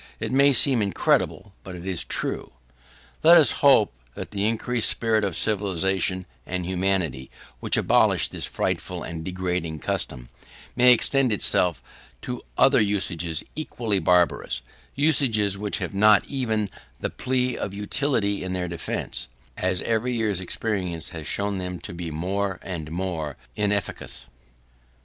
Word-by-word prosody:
It - - -3
may 140 +2 +5
seem 130 -3 +4
incredible, 100 0 0
but 95 -2 -8
it 90 0 -9
is 95 -3 -1
true. - - -3 0.7
Let 170 +2 +8
us 150 -7 +6
hope 135 - +5 0.2
that - - -7
the 100 0 0
increased 115 +1 +1
spirit 110 -2 +1
of 95 -5 -1
civilisation 95 -2 0 0.2
and 90 -1 -4
humanity 90 -7 -1 0.3
which - - +1
abolished - - +3
this - - -4
frightful - - -3
and 80 -1 -6
degrading 90 -3 -3
custom, - - -3 0.5
may 125 0 +6
extend 130 +1 +3
itself 90 -4 +2 0.4
to 125 -1 -5 0.2
other 135 -2 +5
usages 90 -6 -1
equally 115 -9 -2
barbarous; 90 -2 +1 0.3
usages 130 -9 +3
which 105 +1 -2
have - - -4
not 105 +1 +5
even 110 -7 -2 0.3
the - - -3
plea 125 -1 -1
of 100 - -4
utility 105 0 -1
in 95 0 -4
their 90 -1 -2
defence, 85 -6 -4 0.3
as 95 0 0
every 115 +2 0
year's 105 -5 -1
experience 90 -4 0
has 80 -3 -7
shown 100 -1 0
them 90 -1 -4
to - - -8
be 85 -1 -5
more 95 +4 -2
and 80 -5 -6
more 80 -4 -4 0.2
inefficacious. 105 -1 -2
100 Hz, 140 wpm, -24 LUFS, 90-115 Hz, 0.7 s, Let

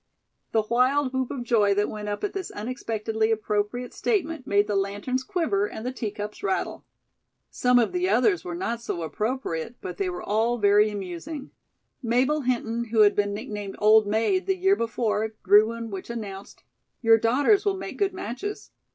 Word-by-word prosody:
The 220 - +2
wild 255 +3 +2
whoop 260 -1 -1
of 255 -3 -4
joy 210 -4 +3
that 205 +1 +2
went 210 -1 -5
up 205 - -4
at 410 - -1
this 385 -2 -4
unexpectedly 220 -1 -2
appropriate 215 +2 -1
statement 325 - -1
made 205 +1 +3
the 205 - -2
lanterns 205 +6 -1
quiver 395 +3 0
and 300 - -8
the 250 - -1
teacups 210 -4 -5
rattle. 385 -2 -2 0.6
Some 250 0 +3
of 225 -5 +3
the 180 +1 0
others 215 -5 +3
were 175 -1 -5
not 230 +6 -3
so 175 -7 -4
appropriate, 220 0 -3
but 180 -1 -7
they 195 -2 -1
were 175 - -6
all 225 +3 +1
very 205 0 +4
amusing. 205 - -6 0.5
Mabel 260 +5 +1
Hinton, 235 -2 -1
who 220 -1 +2
had 205 -1 +6
been 205 0 0
nicknamed 205 -1 -6
"old 215 0 +5
maid" 225 - +1
the 385 -1 +1
year 385 +2 +4
before, 220 - -1
drew 205 +3 +7
one 230 -1 -5
which 195 +2 -6
announced: 200 -4 -7 0.4
"Your 225 0 +6
daughters 285 - +3
will 400 -2 0
make - - -7
good 400 -1 +2
matches." 375 - -6
225 Hz, 175 wpm, -25 LUFS, 205-260 Hz, 0.6 s, drew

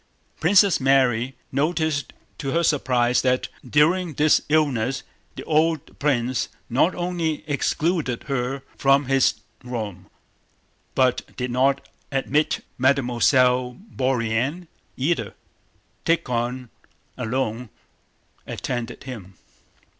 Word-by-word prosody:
Princess 190 +2 +5
Mary 130 -2 +2 0.2
noticed 155 +1 0 0.3
to 140 -4 -3
her 170 +1 +2
surprise 125 -5 +2
that 130 -1 +1
during 155 +5 +2
this 150 +2 +4
illness 135 -5 +1 0.3
the - - -7
old 160 -1 0
prince 130 -3 0 0.2
not 145 +9 +3
only 170 -4 -2
excluded 150 -2 0
her 135 -1 -2
from 140 0 +3
his 135 0 +3 0.3
room, 105 -7 -6 0.9
but 130 -1 +1
did 125 -1 -2
not 135 +2 +1 0.2
admit 145 +2 0
Mademoiselle 125 -1 +3 0.2
Bourienne 130 +6 0 0.3
either. 130 - -1 0.7
Tíkhon 125 -5 -1 0.5
alone 125 -1 -2 0.8
attended 120 -1 -4
him. 105 -8 -9
135 Hz, 95 wpm, -23 LUFS, 125-150 Hz, 0.9 s, Princess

